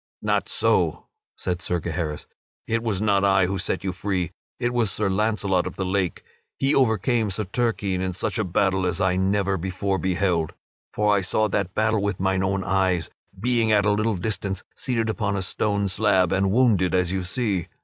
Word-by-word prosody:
"Not - - 0
so," - - +1 0.3
said 90 -1 -3
Sir 90 0 -1
Gaheris, 80 -2 -3 0.4
"it 115 0 0
was 105 -4 -1
not 100 -2 +3
I 95 -2 +4
who 95 +1 -2
set 95 - -2
you 95 - -1
free; 90 -2 -2 0.3
it 120 0 0
was 120 -4 +2
Sir 100 +1 0
Launcelot 100 -2 +1
of - - -7
the 95 - -2
Lake. 95 -2 -1 0.3
He 135 +2 +1
overcame 115 -3 +2
Sir 105 +3 -1
Turquine 100 -3 -1
in 95 -1 -2
such 95 - -2
a - - +2
battle 95 0 +1
as 90 0 -2
I 95 -2 +2
never 95 +1 +1
before 95 +2 -2
beheld. 90 -3 0 0.4
For 105 -1 +2
I 100 - +2
saw 110 +4 +1
that 95 -2 -1
battle 110 -1 +2
with 100 -2 -1
mine 95 0 +1
own 95 0 0
eyes, 95 -2 +1 0.3
being 115 0 +1
at 105 -2 +4
a 105 - +4
little 110 +1 +1
distance 100 -1 -3
seated 115 -4 -1
upon 105 -2 -1
a 95 - -1
stone 100 +1 0
slab 95 -2 +2
and 95 0 +2
wounded 105 -6 +3
as 90 -1 +1
you 95 0 -1
see. 95 -2 -1
95 Hz, 190 wpm, -24 LUFS, 95-110 Hz, 0.4 s, I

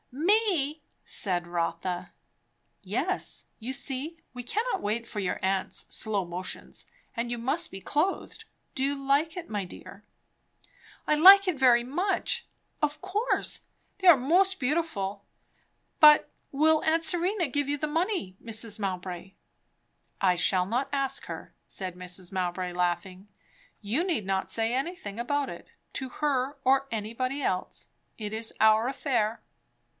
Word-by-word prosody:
"Me?" 325 - +1 0.2
said 180 -3 +2
Rotha. 175 +1 -3 0.7
"Yes. - - -2
You 240 +3 -4
see, 275 +4 -3 0.2
we 250 - -6
cannot 440 - -1
wait 220 +3 -2
for 215 - -5
your 190 -3 -2
aunt's 190 0 0
slow 205 -4 -1
motions, 180 +2 -6 0.3
and 235 +1 -2
you 240 - -3
must 265 +8 +2
be 190 - -9
clothed. 305 - -2 0.3
Do 265 - -2
you 280 +1 +1
like 280 +5 +1
it, 355 - -6
my 205 -2 -2
dear?" 195 +3 -12 1.0
"I - - +2
like 390 +5 +9
it 335 -7 0
very 240 -2 +5
much 360 +9 -1 0.3
of 300 0 0
course 405 +6 -1 0.4
they 375 - +1
are 340 -5 +10
most 365 +8 +3
beautiful; 250 -9 -1 0.8
but 300 -1 +8 0.2
will 310 +2 +3
aunt 325 +1 +2
Serena 350 +2 +2
give 285 +1 -1
you 290 +1 0
the 305 - -2
money, 330 - -1
Mrs. 225 -1 0
Mowbray?" 185 -1 -4 0.9
"I 185 -2 +3
shall 180 +1 +2
not 245 +7 -1
ask 275 -2 -1
her," - - -8
said 185 -2 -5
Mrs. 180 0 -4
Mowbray 180 -1 -2
laughing. 180 +2 -2 0.5
"You 225 +11 0
need 330 - -1
not 190 0 -1
say 225 +1 0
anything 260 - -4
about 285 +3 -1
it, - - -9 0.3
to 265 -1 -3
her 275 0 -1
or 270 +1 +3
anybody 230 +6 -3
else. 185 - -2 0.3
It 210 -1 -5
is 225 +1 -1
our 220 +2 +5
affair. 240 -5 -1
250 Hz, 140 wpm, -28 LUFS, 195-305 Hz, 1.0 s, are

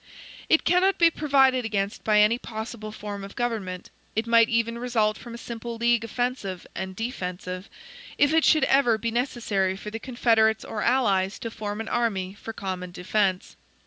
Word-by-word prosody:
It 320 - +4
cannot 365 +3 +3
be 335 -1 +5
provided 270 -5 +3
against 200 -2 -2
by 210 -1 +4
any 220 +3 +3
possible 220 -1 -6
form 205 -1 -7
of 195 - -9
government; 210 -7 -3 0.2
it 220 +1 0
might 230 -1 +5
even 230 0 0
result 225 -3 +1
from 235 +1 -9
a - - -7
simple 235 0 -6
league 235 0 +2
offensive 230 -5 -3
and 190 +1 -5
defensive, 185 -4 -5 0.5
if 285 +2 +4
it 320 -1 +4
should 310 - +5
ever 255 -5 +4
be 230 +1 -2
necessary 225 -6 -1
for 210 +2 -7
the 225 - -5
confederates 225 -3 +2
or 210 - -4
allies 200 -6 +2
to 230 - -6
form 210 -1 -5
an 225 - -6
army 195 -6 -1
for 220 +2 -8
common 185 -4 -5
defense. 185 +1 -1
225 Hz, 175 wpm, -25 LUFS, 200-240 Hz, 0.5 s, be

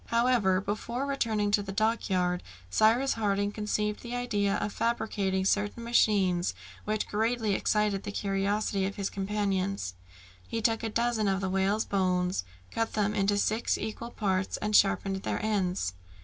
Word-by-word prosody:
However, 230 -6 +3
before 215 +6 -3
returning 220 -7 0
to 205 - +3
the 195 -1 -6
dockyard, 190 -4 +1 0.3
Cyrus 230 - +4
Harding 205 -2 0
conceived 210 0 -2
the 240 0 -5
idea 205 -5 0
of 210 - -2
fabricating 210 -5 0
certain 205 +4 0
machines, 195 -6 +2 0.3
which 215 0 -1
greatly 220 0 0
excited 210 0 +1
the - - -5
curiosity 200 0 0
of 200 - -5
his 200 -1 -3
companions. 195 - -1 0.5
He 230 - -2
took 225 0 +1
a 225 - -2
dozen 230 -1 +1
of 195 -1 +1
the 190 -1 -2
whale's 195 +3 +1
bones, 180 - 0 0.3
cut 225 0 -1
them 210 -1 +1
into 205 -1 +2
six 220 +3 +1
equal 220 +2 -5
parts, 190 -5 -1
and 210 0 -1
sharpened 195 0 +3
their 190 - -2
ends. 185 - 0
205 Hz, 150 wpm, -29 LUFS, 195-220 Hz, 0.5 s, Cyrus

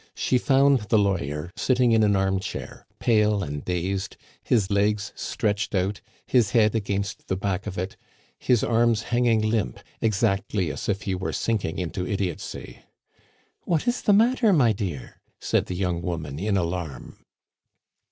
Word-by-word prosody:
She 125 - +1
found 135 +1 +4
the 110 - +4
lawyer 85 -6 -1
sitting 125 -2 +2
in 110 -1 +4
an 105 -2 +3
armchair, 95 0 -2
pale 105 -3 +2
and 75 -1 -5
dazed, 90 +2 -2 0.2
his 105 -5 +1
legs 100 0 +1
stretched 105 0 -2
out, 95 +2 -1 0.2
his 120 -6 +3
head 110 -1 +4
against 100 -2 -3
the 95 - 0
back 100 +1 -2
of 95 - -5
it, 95 +2 -4 0.4
his 120 -4 +2
hands 115 -1 +2
hanging 120 -2 +2
limp, 110 - -1 0.2
exactly 100 -4 0
as 70 - -5
if 100 +1 -1
he 95 - -2
were 95 +1 -3
sinking 110 -8 -1
into 90 0 -3
idiotcy. 95 -3 -4 0.9
"What 165 +2 0
is 240 +1 +1
the - - +3
matter, 230 +1 +4
my 125 - +4
dear?" 90 - -6 0.2
said - - 0
the 90 - -4
young 90 -2 -1
woman 80 -5 -4
in 100 +1 0
alarm. 85 -4 -4
100 Hz, 150 wpm, -25 LUFS, 90-115 Hz, 0.9 s, found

